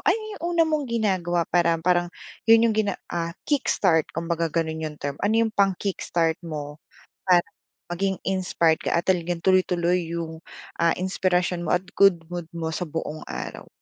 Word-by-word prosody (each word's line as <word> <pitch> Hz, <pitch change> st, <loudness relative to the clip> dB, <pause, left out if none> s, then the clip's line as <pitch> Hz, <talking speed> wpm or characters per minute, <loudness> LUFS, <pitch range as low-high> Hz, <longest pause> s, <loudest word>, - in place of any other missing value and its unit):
ano -, -, +4 dB, 0.2 s
yung -, -, -16 dB
una 330 Hz, -, +6 dB
mong 305 Hz, -4 st, -1 dB
ginagawa 185 Hz, -7 st, 0 dB
para 170 Hz, -1 st, +2 dB
parang 175 Hz, +1 st, +1 dB, 0.4 s
yun 225 Hz, 0 st, +7 dB
yung -, -, +1 dB
gina 210 Hz, -3 st, 0 dB, 0.2 s
ah, 170 Hz, 0 st, -3 dB
kickstart 185 Hz, -, +2 dB
kumbaga 165 Hz, 0 st, -1 dB
gano'n 160 Hz, 0 st, -2 dB
'yong 150 Hz, -, -12 dB
term, 145 Hz, -1 st, -5 dB
ano 210 Hz, +2 st, +1 dB
'yong 220 Hz, -, -2 dB
pang-kickstart 185 Hz, -5 st, 0 dB
mo 150 Hz, -3 st, -7 dB, 0.4 s
para 180 Hz, -2 st, +4 dB, 0.5 s
maging 190 Hz, +1 st, -1 dB
inspired 180 Hz, -4 st, +1 dB
ka -, -, -1 dB
at 170 Hz, -, 0 dB
talagang 175 Hz, -2 st, +1 dB
tuloy-tuloy 180 Hz, -1 st, +2 dB
'yong, 165 Hz, -1 st, -5 dB, 0.4 s
ah, 170 Hz, -, +5 dB
inspirasyon 180 Hz, -1 st, 0 dB
mo 165 Hz, -, -2 dB
at 180 Hz, +1 st, +1 dB
good 195 Hz, -4 st, +5 dB
mood 175 Hz, -1 st, -6 dB
mo 160 Hz, -1 st, -4 dB
sa -, -, -2 dB
buong 155 Hz, -1 st, -5 dB
araw? -, -, -7 dB
175 Hz, 165 wpm, -24 LUFS, 165-190 Hz, 0.5 s, yun